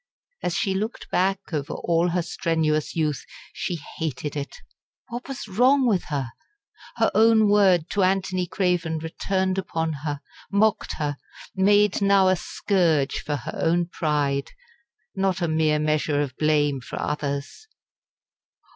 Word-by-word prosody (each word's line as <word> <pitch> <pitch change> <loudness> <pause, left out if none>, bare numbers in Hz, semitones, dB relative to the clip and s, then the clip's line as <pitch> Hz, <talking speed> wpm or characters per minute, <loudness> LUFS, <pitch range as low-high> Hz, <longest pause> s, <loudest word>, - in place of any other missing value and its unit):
As 175 - -1
she 195 - 0
looked 215 +4 -4
back 190 0 0
over 145 -2 -2
all 170 +1 +1
her 175 0 0
strenuous 160 -4 -1
youth 155 -4 -1 0.3
she 175 - -3 0.2
hated 150 -2 -3
it. 145 -1 -5 0.5
What 240 +1 -6
was 270 -5 -6
wrong 255 +7 +4
with 210 -7 +1
her? 135 -5 -3 0.6
Her - - +2
own 220 0 +5
word 190 -5 +4
to 200 - +1
Anthony 185 -1 +1
Craven 175 -3 0
returned 190 +4 -1
upon 165 -3 -2
her, 145 -2 -3 0.3
mocked 210 +1 +2
her 145 -2 -3 0.4
made 205 +1 +3
now 195 -1 +5
a 185 - +4
scourge 170 -5 0
for 150 - -2
her - - -6
own 170 +1 +1
pride, 145 -5 -1 0.7
not 190 -1 0
a 175 - 0
mere, 155 -1 +2
measure 150 -1 +1
of 140 -4 -2
blame 145 -3 +1
for - - -7
others. 145 - -4
170 Hz, 140 wpm, -24 LUFS, 150-195 Hz, 0.7 s, own